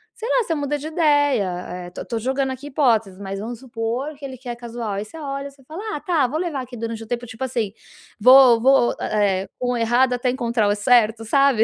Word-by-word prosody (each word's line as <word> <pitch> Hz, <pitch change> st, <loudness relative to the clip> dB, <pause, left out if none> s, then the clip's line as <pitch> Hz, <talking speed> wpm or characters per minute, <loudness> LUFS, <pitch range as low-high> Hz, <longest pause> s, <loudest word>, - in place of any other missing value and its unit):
sei 465 Hz, +1 st, -5 dB
lá, -, -, +3 dB
você 345 Hz, -, -2 dB
muda 290 Hz, -1 st, -1 dB
de 290 Hz, -, -9 dB
ideia, 265 Hz, -, +1 dB
eh, -, -, -9 dB
tô 180 Hz, -, -8 dB
tô 230 Hz, -2 st, -3 dB
jogando 265 Hz, +3 st, -1 dB
aqui 260 Hz, +2 st, -7 dB
hipóteses, 230 Hz, -9 st, +1 dB
mas 195 Hz, 0 st, -5 dB
vamos 230 Hz, +3 st, -5 dB
supor 245 Hz, +3 st, -3 dB
que 285 Hz, -, -19 dB
ele 260 Hz, -2 st, -6 dB
quer 245 Hz, -1 st, -6 dB
casual. 235 Hz, -2 st, -6 dB
Aí 200 Hz, +1 st, -2 dB
você 215 Hz, +9 st, -12 dB
olha, 280 Hz, -2 st, -5 dB
você 275 Hz, -1 st, -21 dB
fala: 315 Hz, +9 st, -8 dB, 0.2 s
"Ah, -, -, -7 dB
tá, 315 Hz, -7 st, +1 dB
vou 295 Hz, +6 st, -3 dB
levar 330 Hz, -7 st, -2 dB
aqui 250 Hz, -1 st, -9 dB
durante 225 Hz, 0 st, -4 dB
o 225 Hz, -, -12 dB
tempo", 245 Hz, 0 st, -3 dB
tipo 225 Hz, +2 st, -7 dB
assim 235 Hz, -6 st, -2 dB, 0.5 s
vou 250 Hz, 0 st, +7 dB
vou, 265 Hz, -1 st, +4 dB
eh 200 Hz, -3 st, +1 dB
eh, -, -, -13 dB
com 250 Hz, 0 st, 0 dB
o -, -, -1 dB
errado 240 Hz, +3 st, +2 dB
até 250 Hz, +1 st, 0 dB
encontrar 235 Hz, -4 st, 0 dB
o 205 Hz, -, +2 dB
certo, 225 Hz, 0 st, +3 dB
sabe, 275 Hz, -1 st, +4 dB
245 Hz, 235 wpm, -22 LUFS, 225-275 Hz, 0.5 s, vou